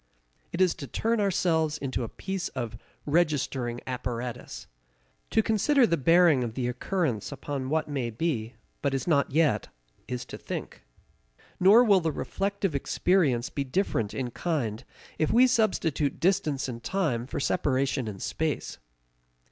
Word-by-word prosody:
It 175 - -2
is 185 -2 +4
to 140 - -5
turn 225 - 0
ourselves 165 -5 +1
into 135 -4 -3
a 115 - -4
piece 190 -1 -4
of 120 -3 -3 0.3
registering 140 -6 0
apparatus. 125 -1 -5 0.6
To 220 - +3
consider 245 +6 +3
the 170 - +2
bearing 165 -2 +5
of 115 -2 -4
the 125 -2 -1
occurrence 125 - -1
upon 140 -2 -4
what 160 +1 0
may 135 -5 -2
be, 115 -3 -2 0.3
but 140 -1 0
is 135 - -2
not 145 -5 +2
yet, 155 +2 +2 0.4
is 125 -1 -4
to - - -9
think. - - -6 0.8
Nor 205 +6 +7
will 205 -5 +5
the 165 -2 -1
reflective 195 +2 -2
experience 140 -3 +1
be 140 - -2
different 130 - -1
in 125 -3 -3
kind 125 -8 -2 0.4
if 155 - +2
we 245 +2 +6
substitute 190 - +1
distance 155 -7 +1
in 120 -2 -5
time 130 -6 -1
for - - -4
separation 135 -2 0
in 105 -2 -5
space. 155 +9 -3
145 Hz, 150 wpm, -27 LUFS, 125-180 Hz, 0.8 s, Nor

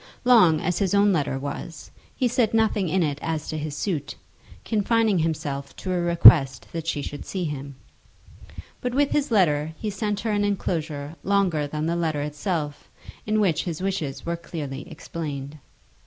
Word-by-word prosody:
Long 220 -11 +6
as 175 +2 -1
his 195 -1 +1
own 200 0 +4
letter 145 -5 0
was, 145 +3 -7 0.2
he 255 - +1
said 235 -2 +1
nothing 215 -5 +2
in 185 +2 +2
it 145 -2 -2
as 160 -2 -3
to 155 - -3
his 150 -1 -5
suit, 150 -5 -3 0.5
confining 220 -2 +2
himself 145 -4 -3
to 185 - -4
a 180 - 0
request 165 -6 +6
that 165 -1 -5
she 150 -3 -1
should 145 - -6
see 185 -2 -4
him. 140 -3 -5 1.1
But 250 0 -2
with 285 0 +2
his 290 -1 +1
letter 160 -8 +2
he 215 - -3
sent 205 +1 -2
her 225 - -1
an 205 0 +1
enclosure 160 -7 -2
longer 185 -6 +1
than 150 +1 -3
the 170 +1 0
letter 160 -4 -1
itself, 150 0 -3 0.4
in 215 0 +2
which 185 -7 +1
his 170 -4 -4
wishes 165 -8 -3
were 170 0 -1
clearly 155 -3 -6
explained. 150 -3 -6
165 Hz, 170 wpm, -24 LUFS, 150-200 Hz, 1.1 s, Long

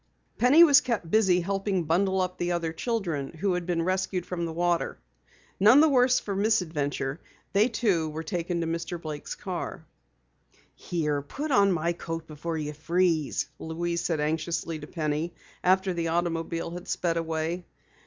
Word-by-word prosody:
Penny 280 +8 +7
was 290 -4 +7
kept 230 - -2
busy 190 -5 +4
helping 195 0 -1
bundle 190 +4 +2
up 185 0 -3
the 175 0 0
other 165 -2 -2
children 170 - -2
who 185 +3 0
had 180 -1 -3
been 170 -2 0
rescued 185 0 -1
from 170 -2 -3
the - - -4
water. 175 +1 0 0.6
None 215 +8 +7
the 315 +1 +6
worse 255 -2 +4
for 200 - -4
the 195 - 0
misadventure, 160 -9 0 0.3
they 205 +3 +5
too 200 -9 +1
were 155 +1 -5
taken 170 +1 -2
to - - -1
Mr. 170 +1 -3
Blake's 155 -3 -6
car. - - -5 0.9
"Here, 150 -4 -2
put 285 - -5
on 200 -6 +5
my 170 0 0
coat 165 -1 -5
before 160 +1 -5
you 150 -1 -3
freeze," 165 0 +1
Louise 170 +1 -2
said 165 -3 0
anxiously 160 +1 -2
to 150 - -9
Penny 155 +1 -2 0.3
after 190 +1 +3
the 170 -1 -2
automobile 165 0 -1
had 175 +1 -8
sped 170 -2 0
away. 165 +2 -2
170 Hz, 165 wpm, -27 LUFS, 160-190 Hz, 0.9 s, Penny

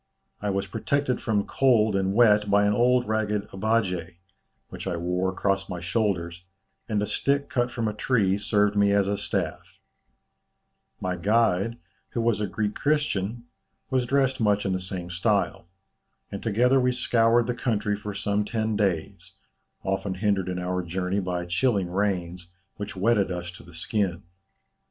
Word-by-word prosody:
I 105 - -1
was 100 0 -1
protected 130 +2 -1
from 105 -3 0
cold 110 -6 +3
and 95 0 0
wet 105 -3 +5
by 100 0 +4
an 105 - +3
old 125 +2 +3
ragged 105 -1 -1
'abbaje,' 95 -4 0 0.5
which - - -7
I 85 - -1
wore 90 +2 0
across 95 +1 -1
my 90 -2 -4
shoulders, 90 -2 -1 0.5
and 105 -2 +1
a - - +1
stick 140 +5 0
cut 120 -1 +1
from 115 -2 -2
a 105 - -1
tree 105 -4 +1
served 105 0 +2
me 100 0 +4
as 100 -1 +3
a 100 - 0
staff; - - -3 1.2
my 90 0 -2
guide, 110 +2 +1 0.3
who 120 - -2
was 115 -2 +1
a 105 - 0
Greek 105 +1 -2
Christian, 120 -7 0 0.5
was 130 -2 +1
dressed 135 -1 +1
much 105 -1 +2
in 95 - 0
the 95 - -1
same 90 -1 -5
style; 100 0 0 0.6
and 100 - -5
together 125 +5 +3
we 125 0 +2
scoured 120 -1 +3
the 125 - -1
country 110 -4 -1
for 105 0 -6
some 100 +1 0
ten 110 0 -1
days, 95 -6 -2 0.5
often 95 0 -2
hindered 95 -1 0
in 90 - -3
our 90 0 -1
journey 90 +3 -2
by 90 -2 -2
chilling 95 0 +1
rains, 90 -3 -1 0.3
which 100 0 -6
wetted 100 0 +2
us 90 -1 -4
to 90 - -13
the 85 - -15
skin. 90 0 -1
105 Hz, 165 wpm, -26 LUFS, 95-115 Hz, 1.2 s, wet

